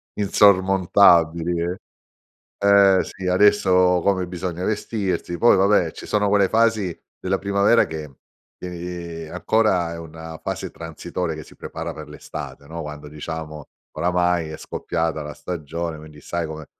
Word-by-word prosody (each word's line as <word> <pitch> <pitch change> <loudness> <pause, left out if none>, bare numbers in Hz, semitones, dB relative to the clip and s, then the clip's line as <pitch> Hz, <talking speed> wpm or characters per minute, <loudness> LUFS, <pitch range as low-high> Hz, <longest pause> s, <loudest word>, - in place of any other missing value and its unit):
insormontabili 95 -4 +4
eh. 90 +2 -2 0.8
Eh 100 -1 +5
sì 95 -1 -8
adesso 90 -1 +4
come 95 -2 +1
bisogna 90 -1 -4
vestirsi, 100 -5 -2
poi 120 - +5
vabbè 95 -3 +3
ci - - -10
sono 105 -1 +1
quelle 100 -1 +3
fasi 110 -5 +1 0.2
della 95 +1 -1
primavera 100 +4 +3
che, 75 -5 -8 0.4
tieni 85 -2 -6
ancora 90 -1 +1
è - - -7
una 80 0 -9
fase - - -4
transitoria 85 +1 -5
che 80 - -8
si - - -17
prepara - - -6
per - - -10
l'estate, 70 - -8
no, 80 +1 -6
quando 75 -1 -8
diciamo 75 0 -7 0.3
oramai 90 0 +1
è 80 - -6
scoppiata 80 -2 -3
la 75 0 -7
stagione 80 +1 -5
quindi 75 -1 -13
sai 85 +1 -3
com'è. 80 0 -7
90 Hz, 140 wpm, -22 LUFS, 80-95 Hz, 0.8 s, Eh